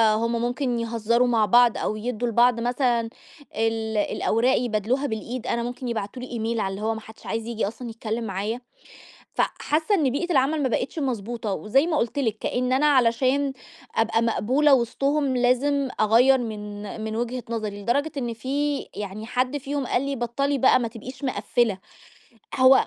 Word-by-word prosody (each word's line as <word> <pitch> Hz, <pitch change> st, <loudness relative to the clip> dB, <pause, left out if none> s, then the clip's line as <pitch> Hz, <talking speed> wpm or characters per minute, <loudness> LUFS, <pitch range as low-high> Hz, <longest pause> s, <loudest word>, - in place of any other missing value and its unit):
هم 230 Hz, +1 st, 0 dB
ممكن 245 Hz, 0 st, -1 dB
يهزَّروا 230 Hz, +1 st, +1 dB
مع 230 Hz, -3 st, +3 dB
بعض 240 Hz, +1 st, +5 dB
أو 215 Hz, -, -1 dB
يدّوا 240 Hz, +2 st, -2 dB
لبعض 235 Hz, +1 st, +4 dB
مثلًا 245 Hz, 0 st, +1 dB, 0.5 s
ال 225 Hz, 0 st, -1 dB
الأوراق 230 Hz, +4 st, +2 dB
يبادلوها 240 Hz, +4 st, 0 dB
بالإيد، 230 Hz, +2 st, -5 dB
أنا 235 Hz, -, 0 dB
ممكن 245 Hz, +1 st, -5 dB
يبعتوا 230 Hz, +1 st, -4 dB
لي 235 Hz, -2 st, -3 dB
email -, -, -1 dB
على 195 Hz, -2 st, -1 dB
اللي 195 Hz, +2 st, -6 dB
هو 225 Hz, +1 st, 0 dB
ما 220 Hz, -, -7 dB
حدّش 220 Hz, 0 st, -15 dB
عايز 225 Hz, 0 st, -3 dB
ييجي 225 Hz, -3 st, -1 dB
أصلًا 235 Hz, +2 st, -7 dB
يتكلِّم 225 Hz, 0 st, -4 dB
معايا. 210 Hz, +4 st, -3 dB, 0.7 s
فحاسّة 315 Hz, +7 st, 0 dB
إن 300 Hz, -9 st, +2 dB
بيئة 340 Hz, +7 st, -1 dB
العمل 285 Hz, +2 st, +2 dB
ما 260 Hz, -, +2 dB
بقتش 250 Hz, +7 st, -2 dB
مضبوطة. 235 Hz, -5 st, -2 dB
وزي 270 Hz, -, +2 dB
ما 325 Hz, -, 0 dB
قُلت 240 Hz, +2 st, -1 dB
لِك 225 Hz, -5 st, 0 dB
كإن 250 Hz, +1 st, -1 dB
أنا 275 Hz, +3 st, +3 dB
علشان 260 Hz, +1 st, +3 dB, 0.4 s
أبقى 225 Hz, 0 st, +2 dB
مقبولة 260 Hz, +6 st, +3 dB
وِسطهم 275 Hz, +3 st, +1 dB
لازم 265 Hz, +3 st, +2 dB
أغَيَّر 240 Hz, +5 st, +5 dB
من 210 Hz, -2 st, -6 dB
من 220 Hz, 0 st, -3 dB
وجهة 240 Hz, +1 st, -2 dB
نظري، 210 Hz, -3 st, -3 dB
لدرجة 280 Hz, +9 st, 0 dB
إن 240 Hz, -3 st, -2 dB
في 280 Hz, +5 st, -1 dB, 0.2 s
يعني 205 Hz, +1 st, -6 dB
حد 255 Hz, +4 st, 0 dB
فيهم 280 Hz, -1 st, -3 dB
قال 245 Hz, -, +1 dB
لي: 275 Hz, 0 st, -2 dB
"بَطّلي 275 Hz, +4 st, -1 dB
بقى 255 Hz, 0 st, +5 dB
ما 235 Hz, -, -1 dB
تبقيش 255 Hz, +4 st, -9 dB
مِقَفِّلة." 240 Hz, -5 st, 0 dB, 0.8 s
هو 260 Hz, +1 st, +6 dB
240 Hz, 170 wpm, -24 LUFS, 225-265 Hz, 0.8 s, هو